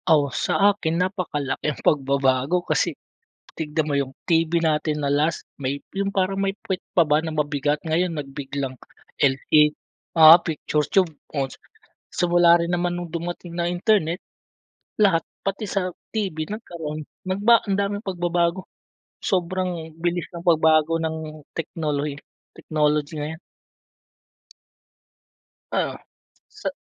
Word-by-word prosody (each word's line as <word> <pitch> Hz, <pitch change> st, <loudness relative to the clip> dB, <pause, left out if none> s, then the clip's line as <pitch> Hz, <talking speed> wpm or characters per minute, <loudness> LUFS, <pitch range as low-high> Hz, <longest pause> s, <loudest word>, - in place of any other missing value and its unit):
Oh, 145 Hz, -4 st, +4 dB
sa -, -, 0 dB, 0.2 s
akin 165 Hz, -4 st, -2 dB
napakalaki 180 Hz, -7 st, -1 dB
ang 150 Hz, -, -5 dB
pagbabago. 140 Hz, +3 st, +2 dB
Kasi -, -, 0 dB, 0.6 s
tignan 155 Hz, 0 st, -1 dB
mo 145 Hz, -, 0 dB
yung 135 Hz, -1 st, -1 dB, 0.2 s
TV 165 Hz, -1 st, +2 dB
natin 155 Hz, -1 st, 0 dB
na 140 Hz, -, 0 dB
last, 150 Hz, +3 st, 0 dB
may 140 Hz, +1 st, -3 dB, 0.2 s
yung 200 Hz, 0 st, 0 dB
parang 195 Hz, 0 st, 0 dB
may 195 Hz, 0 st, 0 dB, 0.2 s
pwet 190 Hz, -2 st, -2 dB
pa 170 Hz, -4 st, +4 dB
ba 150 Hz, +2 st, +3 dB
na 160 Hz, -, -3 dB
mabigat. 145 Hz, -1 st, 0 dB
Ngayon 170 Hz, +2 st, +1 dB
nagbiglang 140 Hz, -2 st, -5 dB, 0.4 s
LED, 150 Hz, +2 st, +4 dB, 0.5 s
oo, 160 Hz, 0 st, +12 dB
picture 150 Hz, -1 st, -1 dB
tube. 185 Hz, -4 st, +3 dB, 0.2 s
Oh, 140 Hz, -3 st, -1 dB, 0.6 s
simula 175 Hz, -1 st, +5 dB
rin 170 Hz, -, -1 dB
naman 175 Hz, 0 st, 0 dB
nung 175 Hz, -1 st, -5 dB
dumating 170 Hz, 0 st, -5 dB
na 170 Hz, -, 0 dB
internet, 180 Hz, -2 st, +1 dB, 0.8 s
lahat 190 Hz, -6 st, +4 dB, 0.2 s
pati 195 Hz, +2 st, -2 dB
sa 185 Hz, -2 st, -1 dB, 0.2 s
TV 200 Hz, -7 st, -2 dB
nagkaroon, 160 Hz, -8 st, -6 dB, 0.2 s
nagba 205 Hz, +5 st, +4 dB
ang 195 Hz, -, +1 dB
daming 205 Hz, +1 st, -1 dB
pagbabago. 175 Hz, -1 st, 0 dB, 0.6 s
Sobrang 180 Hz, -3 st, -1 dB
bilis 175 Hz, +1 st, -2 dB
ng 170 Hz, -1 st, -8 dB
pagbago 160 Hz, -1 st, +4 dB
ng 160 Hz, -1 st, -4 dB, 0.2 s
teknolohi 150 Hz, -3 st, -3 dB, 0.4 s
technology 150 Hz, 0 st, 0 dB
ngayon. 155 Hz, +2 st, -5 dB, 2.3 s
Oo, -, -, 0 dB, 0.6 s
sa -, -, -7 dB
165 Hz, 125 wpm, -23 LUFS, 150-180 Hz, 2.3 s, oo